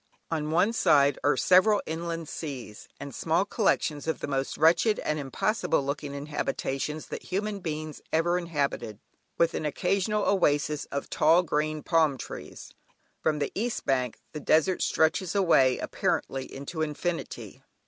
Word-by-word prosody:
On 155 -2 -1
one 180 +8 +2
side 145 - +4
are - - +3
several 195 +6 +5
inland 165 0 -4
seas, 130 -11 -7
and 140 -1 -7
small 165 +8 +1
collections 160 -8 0
of 160 - -1
the - - -3
most 135 -1 -2
wretched 175 +7 +4
and 155 0 -2
impossible 140 - 0
looking 140 0 -4
habitations 150 0 -3
that - - -5
human 205 +2 -2
beings 155 -3 -5
ever 170 +2 +2
inhabited, 145 - -2 0.4
with 170 0 +3
an - - -3
occasional 195 +7 0
oasis 150 -5 +1
of 140 - -5
tall 165 +3 +4
green 155 -1 -1
palm 160 -5 +2
trees. - - -9 0.5
From 155 -1 +1
the 145 - -2
east 230 +4 -2
bank 130 -3 0 0.2
the 150 - -4
desert 160 +5 +2
stretches 165 +4 +1
away 150 -10 +4
apparently 135 -1 -2
into 140 +4 -6
infinity. 160 +3 -4
155 Hz, 145 wpm, -27 LUFS, 145-175 Hz, 0.5 s, several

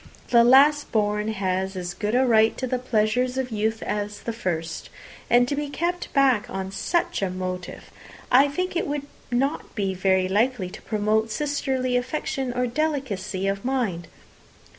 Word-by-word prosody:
The 235 -1 +6
last 285 +4 +5
born 210 -1 +1
has 190 -2 -1
as 175 -1 -4
good 210 +4 -2
a 260 +1 +4
right 220 -2 +4
to 260 - -2
the 255 0 -1
pleasures 250 +1 0
of 260 -2 -2
youth 220 +1 -1
as 205 0 -3
the 230 - -3
first. 170 -7 -4 0.4
And 245 +1 +5
to 285 - -1
be 295 0 -3
kept 345 +4 -2
back 265 -6 +3
on 190 0 -4
such 340 - -1
a 195 - 0
motive! 185 0 -6 0.4
I 270 +3 +6
think 365 +6 -3
it 340 - 0
would 285 0 -3 0.2
not 265 +4 -1
be 195 -3 -1
very 190 0 +2
likely 205 -1 0
to - - -10
promote 215 +1 0
sisterly 265 -1 -1
affection 260 0 -2
or 250 +1 0
delicacy 235 -9 -2
of 195 0 -2
mind." 240 -10 -1
230 Hz, 165 wpm, -24 LUFS, 195-265 Hz, 0.4 s, The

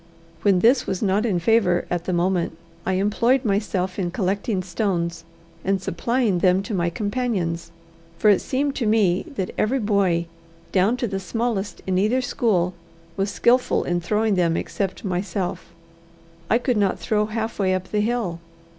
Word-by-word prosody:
When 195 -3 +3
this 245 +5 +4
was 190 - -2
not 205 +3 +2
in 195 -5 +1
favour 180 -1 +2
at 175 -1 -1
the - - -1
moment, 175 -2 0 0.3
I 190 - +2
employed 230 +7 +2
myself 195 -2 -1
in 180 -2 0
collecting 195 +2 -1
stones 170 -3 -2 0.4
and 195 0 +1
supplying 210 +2 0
them 185 +2 +3
to 215 - -5
my 175 -3 +1
companions, 205 -4 -2 0.5
for 210 - +4
it 200 - +3
seemed 280 +2 -1
to 235 - 0
me 210 - +2
that 190 -7 -2
every 240 +6 +2
boy, 200 -7 +1 0.5
down 200 +6 +3
to 245 - -1
the 195 -2 -3
smallest 215 0 -3
in 185 -1 +1
either 215 +6 +2
school, 200 -8 +1 0.4
was 195 +1 0
skilful 245 +5 +2
in 175 0 -1
throwing 210 +4 +1
them, 170 -3 +2
except 195 +1 -3
myself: 185 0 -3 0.8
I 230 - +5
could 245 -1 0
not 200 -2 +2
throw 210 -2 0
halfway 215 -4 -1
up 185 0 -4
the 210 - +1
hill. 215 -7 -1
195 Hz, 165 wpm, -23 LUFS, 180-225 Hz, 0.8 s, I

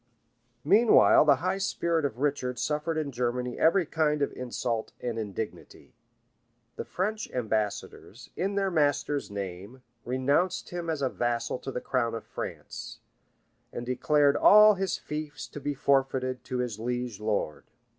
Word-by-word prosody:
[] 120 0 -44
Meanwhile 210 -1 +6
the 145 -2 +6
high 190 +1 0
spirit 170 -5 0
of 130 -5 -3
Richard 130 -3 -1
suffered 155 +2 -1
in 150 -3 -2
Germany 125 0 -2
every 170 +2 +4
kind 150 -2 +1
of - - -2
insult 120 -2 -3
and 120 -2 -3
indignity. 105 0 -7 0.8
The - - -5
French 215 +4 -3
ambassadors, 110 -4 -3
in 195 +2 -1
their 195 -1 +1
master's 145 -3 +1
name, 100 +5 -7 0.2
renounced 140 +9 0
him 175 -1 -4
as 155 -3 -2
a 130 - +2
vassal 120 0 -2
to 135 - -6
the 125 - -4
crown 120 -3 -1
of 115 - -6
France, - - -7 0.7
and 120 - -6
declared 140 +3 +2
all 210 +1 +8
his 195 -2 -2
fiefs 150 -2 -6
to - - -8
be 145 0 -3
forfeited 130 -2 +1
to 125 - -3
his 120 -4 -3
liege 120 -2 -3
lord. 105 -8 -2
130 Hz, 150 wpm, -28 LUFS, 120-155 Hz, 0.8 s, all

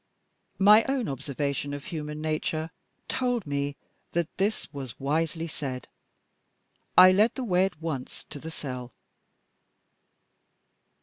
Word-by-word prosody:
My 210 +3 +8
own 265 -5 0
observation 140 +1 -2
of 145 - -8
human 150 -3 -5
nature 155 +1 -1 0.4
told 245 -4 0
me 140 0 -1 0.4
that 170 -1 -1
this 205 +3 0
was 135 -4 -7
wisely 160 +4 0
said. 130 -5 -5 1.1
I 185 0 +11
led 210 +5 +4
the 260 - -3
way 185 -4 +3
at 180 -5 -5
once 155 -6 -4
to 145 - -6
the 160 - -7
cell. 125 -5 -6
155 Hz, 120 wpm, -28 LUFS, 140-185 Hz, 1.1 s, I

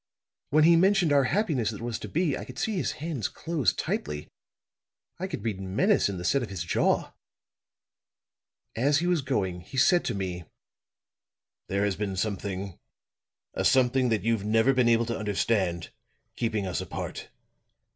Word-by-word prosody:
When 155 +2 +4
he 170 +1 +7
mentioned 185 -2 +4
our 140 -2 +4
happiness 150 - +1
that 105 - -6
was 115 -1 -4
to - - -6
be, 165 -3 0
I - - -6
could - - -11
see 220 - -1
his 180 - -1
hands 150 -7 -3
close 155 - -1
tightly, 75 0 -3 0.9
I - - -2
could - - -6
read 105 -4 -3
menace 105 - +2
in 100 - -4
the 90 - -6
set 140 +9 +2
of 120 - -4
his 95 -5 -4
jaw. 85 - +1 1.6
As 140 +5 +3
he 170 - 0
was 175 -3 +2
going, 95 -10 -2
he 130 - -10
said 175 +7 +4
to 120 - -1
me: 90 -3 -4 1.2
"'There 100 +1 0
has 100 -2 0
been 100 -1 -3
something 100 -2 -3 0.7
a - - -2
something 130 0 +3
that 110 -2 0
you've 115 -2 +1
never 115 +5 +3
been 125 -2 +3
able 115 0 +3
to 115 0 -2
understand 100 -4 0 0.4
keeping 110 -4 -1
us 90 - -2
apart. - - -6
115 Hz, 165 wpm, -27 LUFS, 100-145 Hz, 1.6 s, he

